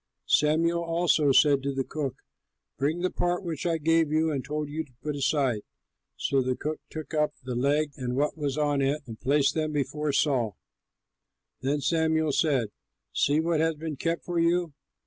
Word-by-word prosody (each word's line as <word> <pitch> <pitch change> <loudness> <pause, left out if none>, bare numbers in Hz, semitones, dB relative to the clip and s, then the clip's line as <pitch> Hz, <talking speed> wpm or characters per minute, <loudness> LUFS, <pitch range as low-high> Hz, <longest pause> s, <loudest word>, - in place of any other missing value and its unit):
Samuel 165 +3 +3
also 165 -3 +2
said 140 0 +5
to 140 0 -2
the 135 - 0
cook, 140 -2 -4 0.6
"Bring 155 +5 0
the 185 - 0
part 175 +1 -1
which 170 -1 -3
I 165 -1 +1
gave 165 0 +2
you 160 +1 +2
and 135 -3 -2
told 150 +2 -3
you 155 +2 -3
to 145 - -21
put 150 0 -2
aside." 135 -5 +1 0.6
So 135 -1 +1
the 130 0 0
cook 155 +3 -4
took 155 -1 -7
up 150 -1 +1
the 125 0 -4
leg 145 +4 +1
and 125 -1 -3
what 145 +2 +1
was 145 -3 -2
on 145 -2 +1
it 140 +2 0
and 115 -3 -9
placed 140 +2 +3
them 155 -1 -1
before 150 +1 -1
Saul. 130 - +1 1.0
Then 140 +3 0
Samuel 160 -1 +2
said, 135 -7 +1 0.4
"See 145 +2 +2
what 165 0 +1
has 160 0 +2
been 155 0 -5
kept 165 +4 -2
for 175 -1 -1
you! 170 -1 +2
150 Hz, 185 wpm, -27 LUFS, 140-160 Hz, 1.0 s, said